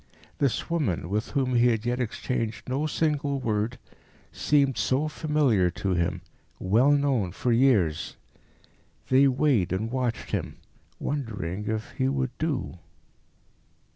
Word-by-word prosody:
This 140 -4 0
woman, 125 - -1
with 105 +3 -1
whom 130 -2 +1
he 120 0 +4
had 115 -2 0
yet 120 +1 0
exchanged 115 -1 -3
no 135 +4 -1
single 145 -3 0
word, 110 0 -1 0.5
seemed 140 -3 +2
so 135 +4 +1
familiar 150 - +2
to 95 +2 -3
him, 85 0 -1 0.4
well 115 +9 +3
known 140 -10 +2
for 120 +6 -1
years. 115 - +2 0.9
They 135 +2 +6
weighed 130 - +2
and 110 +5 -2
watched 125 -3 -2
him, - - -3 0.4
wondering 105 - -3
if 110 0 -3
he 130 -2 -1
would 130 -2 -1
do. 145 - -2
125 Hz, 130 wpm, -26 LUFS, 105-140 Hz, 0.9 s, They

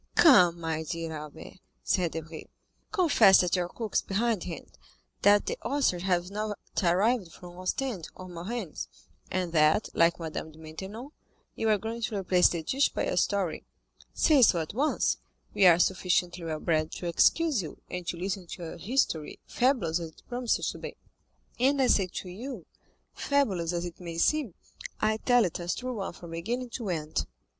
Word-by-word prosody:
"Come, 180 - +6
my 160 -1 -2
dear 165 0 -4
Albert," 150 +4 -10 0.2
said 175 -3 +1
Debray, 160 0 -7 0.5
"confess 330 - +6
that 180 0 +1
your 175 -1 -1
cook 220 0 -6
is - - +3
behindhand, 200 -4 -2 0.5
that 205 0 +5
the - - -3
oysters 245 -9 +1
have 180 0 0
not 210 0 -3 0.2
arrived 190 +2 +2
from 175 +2 -12
Ostend 190 -1 -3
or 185 - -9
Marennes, 180 +1 -5 0.4
and 180 -2 -2
that, 155 +6 +3
like 170 +1 +3
Madame 160 -1 -5
de 155 - -18
Maintenon, 190 - -8 0.4
you 225 - -1
are 215 - +4
going 225 +3 -5
to 220 -1 -2
replace 180 -2 +4
the 170 -2 -3
dish 270 - +2
by - - -3
a - - -1
story. 195 -6 0 0.5
Say 300 -4 +4
so 190 -7 +5
at 160 +2 -4
once; 285 +7 +1 0.4
we 190 - +5
are 170 -2 +7
sufficiently 180 -1 +1
well 155 -1 -3
bred 155 -1 0
to - - -6
excuse 280 - +3
you, 155 -4 -8
and 180 -1 -6
to 175 - -2
listen 185 0 -3
to 175 - -8
your 165 - -7
history, 170 - -1
fabulous 230 - +1
as 165 -1 -5
it - - -21
promises 245 -1 -1
to - - -10
be." - - -8 0.6
"And 275 +3 +3
I 265 - +4
say 200 -6 +3
to 185 - -7
you, 215 - -7 0.5
fabulous 195 - 0
as 175 0 -2
it 175 - -8
may 170 -2 -7
seem, 270 - +1 0.4
I 215 0 +1
tell 245 0 +3
it 175 - -3
as 175 0 -2
a - - -12
true 255 0 -4
one 195 -6 -4
from 170 -1 -11
beginning 235 +9 -3
to 230 -5 -4
end. 155 -2 -2
185 Hz, 180 wpm, -28 LUFS, 170-230 Hz, 0.6 s, are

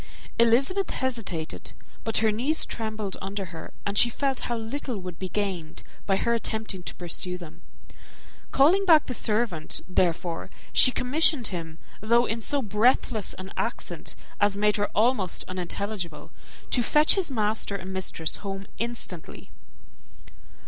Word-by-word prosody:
Elizabeth 270 +12 +3
hesitated; 220 - -3 0.3
but 225 - +1
her 215 - +5
knees 265 +9 +3
trembled 215 -3 -4
under 195 +1 -3
her, 160 - -8
and 200 0 +1
she 240 - +6
felt 270 +1 0
how 240 - 0
little 235 +1 -3
would 180 -3 -7
be 185 - -4
gained 185 -6 -2 0.2
by 195 - +4
her 235 - +1
attempting 220 -4 -2
to - - -4
pursue 180 +1 -2
them. 170 -1 -11 0.9
Calling 330 +9 +5
back 325 -6 +6
the 255 - -4
servant, 215 -9 0
therefore, 175 -2 0 0.2
she - - +7
commissioned 260 -1 +2
him, 165 -3 -5 0.2
though 235 +3 +4
in 230 0 -2
so 280 +4 +1
breathless 215 0 +2
an 185 +1 -8
accent - - -3 0.2
as 205 -1 +3
made 210 +1 +3
her 205 0 +1
almost 215 -4 +2
unintelligible, 185 -1 -4 0.4
to 245 - +5
fetch 300 +5 +5
his 380 -5 +1
master 215 -4 +1
and 190 0 -5
mistress 175 -3 -1
home 195 -1 -5
instantly. 230 -8 -5
210 Hz, 140 wpm, -26 LUFS, 185-240 Hz, 0.9 s, she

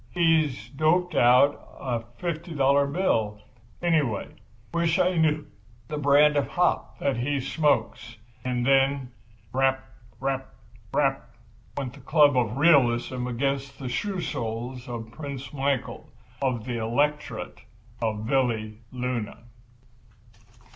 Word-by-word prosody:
"He's 155 -9 +1
doped 165 +6 +1
out 125 +4 +3
a 125 -3 -2 0.2
fifty 170 -1 -4
dollar 140 0 +3
bill, 115 - 0 0.4
anyway. 150 - +1 0.4
Wish 170 0 +2
I 180 0 +2
knew 155 -2 +2 0.4
the 150 -1 -3
brand 145 +1 +5
of 145 - +1
hop 180 0 0
that 140 -4 0
he 140 +4 0
smokes." 120 -5 0 0.3
And 125 -1 -1
then 135 -1 +2 0.4
"Rap, 135 0 +1 0.3
rap, 135 - -3 0.4
rap!" - - 0 0.5
went 130 -4 -3
the 140 - -13
club 145 +1 +4
of 120 -1 +1
realism 125 -5 +3
against 135 +2 -2
the 130 -2 -5
shoe 190 +8 -2
soles 120 0 -4
of 115 -2 -6
Prince 140 +1 -7
Michael, 135 -2 -2 0.3
of 125 -5 -1
the 125 -2 -3
Electorate 145 +7 -1 0.4
of 110 -2 -1
Valleluna. 115 -1 -2
135 Hz, 115 wpm, -26 LUFS, 120-150 Hz, 0.5 s, brand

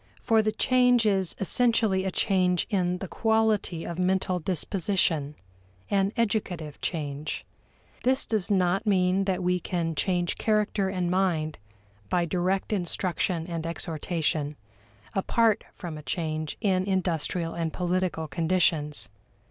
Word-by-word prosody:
For 225 -2 +4
the 215 0 +1
change 250 -1 +3
is 190 -4 +1
essentially 205 -1 +2
a - - +1
change 180 -2 +2
in 180 -3 +1
the 195 - -6
quality 220 -6 +1
of 170 +1 -5
mental 185 0 +1
disposition 170 -3 0 0.6
an 195 0 +2
educative 185 -9 -1
change. 150 -3 -3 0.6
This 260 +2 +2
does 215 -5 -1
not 190 +1 +2
mean 190 -1 +3
that 190 -1 -1
we 180 0 +2
can 170 -2 -2
change 175 +1 0
character 210 -2 +1
and 180 -2 -1
mind 170 - 0 0.5
by 175 -1 +2
direct 185 +4 0
instruction 175 -2 -1
and 165 -2 -3
exhortation, 160 -2 -2 0.6
apart 220 +2 +2
from 165 -4 -6
a - - -8
change 155 -1 -3
in 190 -4 +2
industrial 175 -3 0
and 165 -1 -2
political 180 -2 -1
conditions. 160 -1 +1
180 Hz, 125 wpm, -27 LUFS, 165-195 Hz, 0.6 s, For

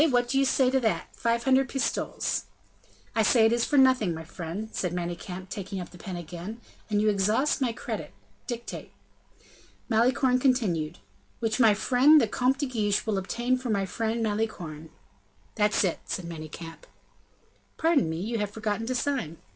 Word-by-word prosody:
what 245 -2 +2
do 270 +2 +1
you 275 - +4
say 260 -1 +3
to 265 - +3
that? 225 -4 0
Five 235 0 0
hundred 265 +1 +3
pistoles." 270 0 -1 0.7
"I 225 - +3
say 220 +1 +5
it 225 - +4
is 235 0 +2
for 290 - +1
nothing, 255 -10 +4
my 160 - -7
friend," 175 +6 -6
said 180 -2 -2
Manicamp, 180 +1 -5
taking 195 -2 -5
up 180 - -7
the 180 - -14
pen 185 0 -6
again, 175 +6 -7 0.3
"and 210 -1 +2
you 215 - +2
exhaust 215 +9 +2
my 250 -3 +2
credit. 230 - -5 0.4
Dictate." 235 -1 -6 1.0
Malicorne 250 +3 +3
continued: 180 - +1 0.4
"Which 225 +1 -1
my 220 -4 +6
friend 265 +8 +5
the 235 - +2
Comte 255 +5 +1
de 285 - -1
Guiche 215 -6 0
will 210 -3 0
obtain 240 +6 -1
for 250 -1 -5
my 200 -3 +1
friend 225 +4 -2
Malicorne." 180 -8 -3 0.6
"That's 210 -1 +2
it," 180 -4 0
said 185 - -4
Manicamp. 165 0 -8 0.9
"Pardon 320 - +3
me, 160 - -3
you 225 +5 -2
have 210 -1 -1
forgotten 220 +1 -3
to 255 - -1
sign." 245 - -1
220 Hz, 170 wpm, -27 LUFS, 185-250 Hz, 1.0 s, my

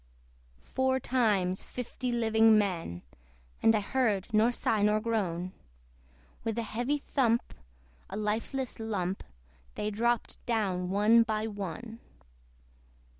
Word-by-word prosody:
Four 260 0 +1
times 210 -8 +1
fifty 250 0 -5
living 225 -2 +4
men, 170 - -1 0.6
(And 225 - +5
I 210 - +2
heard 210 -3 0
nor 220 +3 +4
sigh 225 -3 0
nor 210 +1 +3
groan) 185 -6 -1 0.9
With 225 -1 -2
heavy 240 +5 -1
thump, 245 -5 0 0.6
a 195 - -5
lifeless 225 +5 -2
lump, 195 -4 -2 0.5
They 210 0 -2
dropped 235 +3 -1
down 190 -6 0
one 210 +4 +5
by 220 -1 0
one. 210 +2 -6
220 Hz, 110 wpm, -30 LUFS, 200-235 Hz, 0.9 s, And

